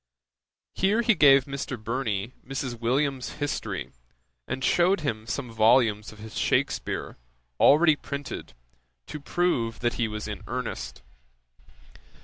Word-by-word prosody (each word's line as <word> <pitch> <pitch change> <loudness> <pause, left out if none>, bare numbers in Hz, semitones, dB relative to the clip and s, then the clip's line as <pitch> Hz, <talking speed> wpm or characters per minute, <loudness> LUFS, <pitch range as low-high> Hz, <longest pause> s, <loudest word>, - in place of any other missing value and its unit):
Here 205 +5 +2
he 230 - +4
gave 140 -6 +6
Mr. 140 -2 -4
Burney 110 -1 -3
Mrs. 130 -3 -4
Williams's 130 +2 0
history, 145 0 -3 0.6
and 130 - -4
shewed 180 +5 +3
him 110 -7 -3
some 120 +2 -4
volumes 110 -1 +3
of 110 - -14
his 110 +1 -10
Shakspeare - - -1 0.4
already 155 +1 +6
printed, 140 -1 -7 0.5
to 150 - -7
prove 140 -8 -1
that 120 -1 +1
he 115 - +2
was 105 0 -5
in - - -6
earnest. - - -5
130 Hz, 125 wpm, -26 LUFS, 115-145 Hz, 0.6 s, gave